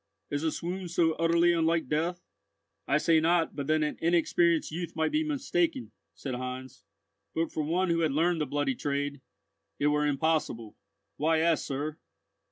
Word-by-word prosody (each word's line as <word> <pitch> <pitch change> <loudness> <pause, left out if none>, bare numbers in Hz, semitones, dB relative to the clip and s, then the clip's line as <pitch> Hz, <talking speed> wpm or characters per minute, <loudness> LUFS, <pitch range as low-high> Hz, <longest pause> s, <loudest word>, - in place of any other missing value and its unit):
"Is 145 0 -1
a 160 - +1
swoon 180 +3 -4
so 165 -1 +2
utterly 170 +1 +4
unlike 165 -2 +1
death?" 170 +5 -1 0.6
"I 140 - +3
say 160 +1 +4
not 165 0 +2
but 140 -2 -4
that 155 0 +2
an 150 - -3
inexperienced 170 0 +2
youth 170 +2 -5
might 160 0 0
be 310 +1 +1
mistaken," 305 -1 -1 0.2
said 135 - -5
Heinz; 130 +1 -6 0.5
"but 165 +1 0
for 155 - -2
one 170 +4 +1
who 165 - +1
had 160 -3 +2
learned 165 +3 +1
the 150 - -1
bloody 145 -2 0
trade, 140 +1 -3 0.6
it - - -1
were 150 0 +2
impossible. 145 -7 -1 0.4
Why 160 +2 +2
ask, 165 0 +2
sir?" 145 +3 -3
160 Hz, 170 wpm, -29 LUFS, 145-170 Hz, 0.6 s, utterly